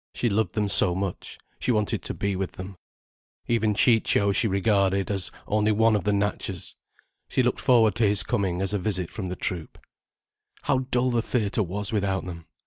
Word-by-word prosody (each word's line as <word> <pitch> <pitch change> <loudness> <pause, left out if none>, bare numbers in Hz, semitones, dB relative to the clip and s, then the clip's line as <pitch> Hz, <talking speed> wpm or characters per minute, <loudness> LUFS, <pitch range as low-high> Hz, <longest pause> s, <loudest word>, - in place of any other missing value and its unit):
She 120 - 0
loved 105 -3 -1
them 105 -2 0
so 95 -2 +6
much, 95 -1 -5 0.2
she - - 0
wanted 105 -3 0
to - - -5
be 100 -1 -2
with 95 0 -4
them. 95 +1 -9 0.7
Even 110 -3 0
Ciccio 105 -2 +4
she 110 +4 +2
regarded 100 -1 +1
as 95 -5 0 0.2
only 105 +1 +1
one 110 +1 +3
of 100 - -2
the 105 - +2
Natchas. 100 -2 -2 0.6
She 130 - +1
looked 125 - 0
forward 115 -6 +4
to 115 -3 +3
his 100 -1 +3
coming 95 -6 -1
as 95 - -1
to 105 - 0
a - - -5
visit 90 -3 -2
from 95 -5 -5
the 90 - -4
troupe. 85 -3 -4 0.9
How 135 -3 +1
dull 125 +1 +1
the 120 -1 +1
theatre 110 -3 -1
was 100 +3 -3
without 95 -3 -1
them! 85 -3 -9
100 Hz, 195 wpm, -25 LUFS, 95-110 Hz, 0.9 s, so